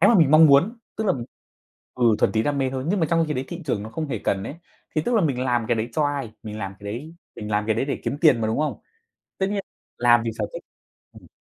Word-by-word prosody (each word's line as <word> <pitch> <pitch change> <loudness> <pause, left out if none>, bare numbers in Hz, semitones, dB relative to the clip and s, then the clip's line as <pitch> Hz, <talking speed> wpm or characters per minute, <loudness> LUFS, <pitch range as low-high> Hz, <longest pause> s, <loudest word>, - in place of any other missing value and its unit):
cái 195 - +6
mà 235 - +5
mình 160 -7 +5
mong 155 +1 +8
muốn, 170 - +4 0.2
tức 220 - -2
là 185 - +4
mình 120 -3 -4 0.7
ừ, 125 - 0
thuần - - +2
túy 110 0 +2
đam 145 +1 0
mê 130 -1 0
thôi, 130 0 -4
nhưng 195 +1 +1
mà 160 - +2
trong 165 -1 +3
khi 150 - -1
đấy 130 +1 -2
thị 175 0 -6
trường 110 -7 -1
nó 110 - -7
không 155 +5 -4
hề 115 - -2
cần 95 0 0
ấy. 145 - -6 0.4
Thì 155 - +1
tức 245 - 0
là 220 - +4
mình 135 -7 0
làm 120 -3 0
cái 120 - +3
đấy 110 +1 -2
cho 155 - +1
ai? 140 -6 -2
Mình 105 -1 -7
làm 95 -2 -5
cái - - -14
đấy 150 +8 -7 0.2
mình 105 0 -6
làm 105 0 0
cái 110 - +2
đấy - - 0
để 140 - -3
kiếm 140 - -2
tiền 150 -9 +5
mà, 110 - 0
đúng 110 +4 -1
không? 155 0 -1 0.6
Tất 190 - +1
nhiên 205 -1 -1 0.4
làm 120 -1 +5
vì 115 - -1
sở 105 - 0
thích. - - -7 0.5
Ừm. - - -15
135 Hz, 295 wpm, -24 LUFS, 115-160 Hz, 0.7 s, mong